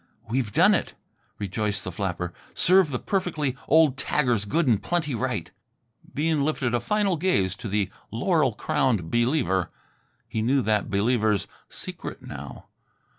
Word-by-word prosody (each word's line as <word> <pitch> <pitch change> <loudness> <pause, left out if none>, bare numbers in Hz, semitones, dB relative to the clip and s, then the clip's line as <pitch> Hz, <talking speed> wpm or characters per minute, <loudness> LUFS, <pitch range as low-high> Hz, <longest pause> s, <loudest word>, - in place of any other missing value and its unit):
"We've 115 -1 -1
done - - +5
it," - - -1 0.4
rejoiced 100 0 -2
the 90 - -5
flapper. 90 -2 -3 0.2
"Serve 185 -2 +5
the 130 - -2
perfectly 155 -7 -1
old 155 -4 +5
taggers 125 -7 +1
good 165 +3 +2
and 110 -5 +3
plenty 160 -2 -1
right!" 115 - -2 0.6
Bean 155 0 +1
lifted 135 -5 0
a 120 - +2
final 195 - +1
gaze 100 - +1
to - - -6
the 100 -1 0 0.2
laurel 140 - +1
crowned 110 -8 0
Believer. 120 - +1 0.6
He 110 - -2
knew 130 +4 +2
that 105 -1 +1
Believer's 105 0 +1 0.2
secret - - -7
now. - - -9
120 Hz, 140 wpm, -25 LUFS, 105-155 Hz, 0.6 s, done